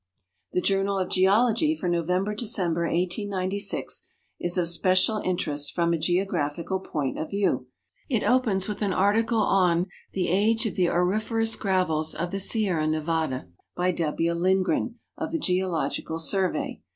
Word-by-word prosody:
The 180 - +1
Journal 195 +1 +1
of 185 - -1
Geologij 230 - +3
for 185 - -3
November 180 +4 0
December, 185 -7 0
1896, 190 +3 -1 0.3
is 175 +1 -1
of 175 -2 +1
special 185 +5 +3
in 185 -3 -1
terest 145 -4 -2
from 170 -1 +1
a - - +1
geographic 170 -2 -1 0.2
point 145 -4 -2
of 155 - -4
view. 200 0 0 0.4
It 235 -6 +1
opens 225 -7 +2
with 210 -1 -5
an 200 -3 +1
article 220 +4 +2
on 180 -2 +3
" - - -31
The 185 -3 0
Age 220 +6 +2
of 220 - -1
the 180 -4 +2
Auriferous 215 +5 0
Gravels 170 -5 0
of 170 +2 -3
the 195 - -2
Sierra 190 -6 +1
Nevada," 155 - -1 0.3
by 180 +1 +1
W. 165 0 -1
Lindgren, 190 +7 +1 0.2
of 315 - -3
the 330 - 0
Geological 180 - -1
Survey. 185 +3 -1
185 Hz, 150 wpm, -26 LUFS, 170-205 Hz, 0.4 s, Geologij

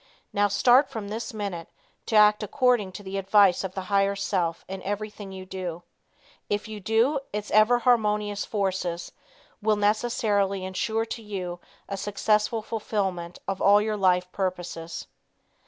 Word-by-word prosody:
Now 205 0 +3
start 245 +8 +4
from 220 -6 -6
this 220 +3 -4
minute, 200 -6 -5 0.4
to 225 - -1
act 210 0 +6
according 235 -2 +1
to 205 - -8
the 195 0 -3
advice 195 -1 +4
of 190 -1 -5
the 190 - -2
higher 195 +1 +1
self 180 -4 -1
in 190 0 -6
everything 205 0 -5
you 190 -1 -8
do. 180 -2 -5 0.7
If 205 +2 -1
you 215 -1 -7
do, 225 +8 +2
its 210 0 -4
ever 215 +3 +5
harmonious 210 -4 +1
forces 190 -4 -2 0.5
will 215 0 +3
necessarily 205 -2 +1
insure 220 +4 -1
to 230 +1 -6
you 185 -5 -5 0.3
a 195 - -4
successful 210 +2 0
fulfilment 195 -6 -3
of 195 -1 -3
all 205 +1 +6
your 215 0 -1
life 180 -2 +2
purposes. 175 -3 -4
205 Hz, 150 wpm, -26 LUFS, 190-215 Hz, 0.7 s, act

